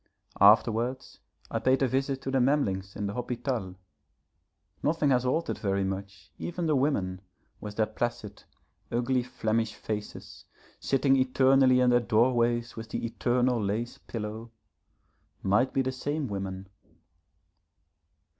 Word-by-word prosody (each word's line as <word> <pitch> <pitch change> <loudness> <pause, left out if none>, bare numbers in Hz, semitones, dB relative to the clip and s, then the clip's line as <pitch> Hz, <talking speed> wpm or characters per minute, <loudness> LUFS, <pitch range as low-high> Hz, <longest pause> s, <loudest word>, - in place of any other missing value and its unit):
Afterwards 115 +5 +3 0.3
I - - 0
paid 130 +1 +2
a - - +3
visit 135 +1 -1
to 135 - -3
the 135 - +2
Memlings 100 -9 0
in 105 - -3
the 100 - -3
Hôpital. 120 -5 -3 1.1
Nothing 150 -1 +1
has 125 -1 +2
altered 160 +6 -1
very 100 -1 0
much; 95 -1 -6
even 175 0 -3
the 155 -2 +2
women, 100 -10 0 0.4
with 105 -1 -7
their 110 - +2
placid, 110 -2 -4 0.5
ugly 125 +2 +1
Flemish 110 -2 -1
faces, 105 -1 -6 0.3
sitting 135 0 +2
eternally 130 0 +4
in 125 -1 +4
their 120 - +5
doorways 120 0 +1
with 115 0 -8
the - - -3
eternal 120 0 +1
lace 110 +4 -3
pillow, 110 +1 -6 0.9
might 105 +7 +2
be 135 - +1
the 130 - -1
same 145 +3 -3
women. 95 -2 -5
120 Hz, 130 wpm, -28 LUFS, 105-130 Hz, 1.1 s, their